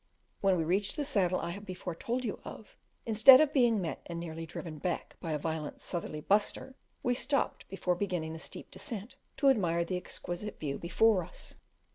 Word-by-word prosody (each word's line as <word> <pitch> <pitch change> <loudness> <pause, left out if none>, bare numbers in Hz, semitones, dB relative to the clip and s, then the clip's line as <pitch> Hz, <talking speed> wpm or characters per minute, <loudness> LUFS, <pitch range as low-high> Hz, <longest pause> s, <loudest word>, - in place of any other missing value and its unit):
When 195 -2 +3
we 165 - +1
reached 195 +5 +1
the 295 -2 -1
saddle 190 -10 +2
I 170 - -3
have 200 +3 -7
before 185 -2 -5
told 240 +9 -2
you 215 - -3
of, 215 - -10 0.3
instead 230 +4 +9
of 305 -1 +3
being 240 -6 +4
met 170 -4 -3
and 170 -1 -4
nearly 165 -1 -6
driven 155 -2 -7
back 175 +3 -3
by 165 - -4
a 155 - +1
violent 160 0 -4
"sutherly 165 -3 -4
buster," 205 - +1 0.3
we 245 - +2
stopped 265 +3 0
before 185 -2 0
beginning 175 -4 -2
the 160 - -7
steep - - -8
descent 230 -3 -6 0.2
to 275 0 +5
admire 170 -8 +1
the 180 +1 -2
exquisite 180 +3 -5
view 140 -3 -3
before 190 +2 +3
us. 175 - -6
185 Hz, 190 wpm, -31 LUFS, 170-225 Hz, 0.3 s, instead